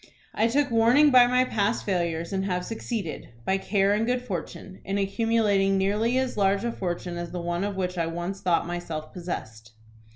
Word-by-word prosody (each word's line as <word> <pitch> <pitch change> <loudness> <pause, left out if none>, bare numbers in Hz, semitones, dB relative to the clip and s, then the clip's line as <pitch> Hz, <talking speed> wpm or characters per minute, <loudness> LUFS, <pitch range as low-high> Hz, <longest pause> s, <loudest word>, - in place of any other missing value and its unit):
I 220 - +2
took 275 +2 +1
warning 240 +6 +5
by 250 -1 +7
my 250 +1 +3
past 215 -2 -1
failures, 170 -2 -1
and 190 0 -1
have 180 -2 -2
succeeded, 225 -6 -5 0.2
by 190 0 +1
care 195 0 +2
and 210 +2 +1
good 245 +1 0
fortune, 185 -2 -6
in 195 +1 -2
accumulating 200 -1 +2
nearly 210 +6 +1
as 260 -3 -1
large 195 0 +2
a 235 - -1
fortune 175 -3 -4
as 175 -1 -5
the 180 - -4
one 175 +1 -2
of 200 -1 -2
which 180 -1 -2
I 165 - 0
once 175 +4 -4
thought 180 -3 +1
myself 170 -3 -5
possessed. 110 -11 -7
195 Hz, 190 wpm, -26 LUFS, 175-225 Hz, 0.2 s, by